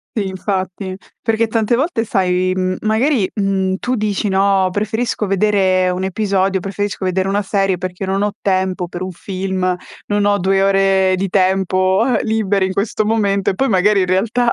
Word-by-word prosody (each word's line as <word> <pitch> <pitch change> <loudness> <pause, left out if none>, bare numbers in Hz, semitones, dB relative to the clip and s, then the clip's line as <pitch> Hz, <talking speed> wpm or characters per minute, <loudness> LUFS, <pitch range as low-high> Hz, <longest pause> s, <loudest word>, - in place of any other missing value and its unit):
Si, 205 -3 0
infatti. 190 0 -3 0.3
Perché 225 0 +1
tante 225 +1 +1
volte, 270 -4 0
sai, 185 -3 0
mhmm, 185 0 -1
magari, 220 0 +1
mhmm, 195 -2 0
tu 250 +4 -2
dici, 210 -1 -1
no: 195 -1 +2
"Preferisco 215 +1 -2
vedere 190 -2 +2
un 185 +1 -3
episodio 195 -1 0
preferisco 200 0 -3
vedere 185 +1 0
una 200 +1 0
serie, 195 -2 0
perché 185 +1 -5
non 195 +1 0
ho 205 - 0
tempo 185 -2 0
per 175 +1 -6
un 185 - -4
film, 185 0 -2 0.3
non 205 0 +1
ho 205 0 +2
2 195 +1 +2
ore 195 -1 +3
di 190 +1 -2
tempo, 190 +1 +2
eh, - - -2
liberi 205 -3 +1
in 190 - -3
questo 210 +1 -1
momento." 200 -3 +1
E - - -5
poi, 270 +8 0
magari 195 +2 +3
in 185 - +1
realtà, 225 +6 +1
195 Hz, 180 wpm, -17 LUFS, 185-210 Hz, 0.3 s, ore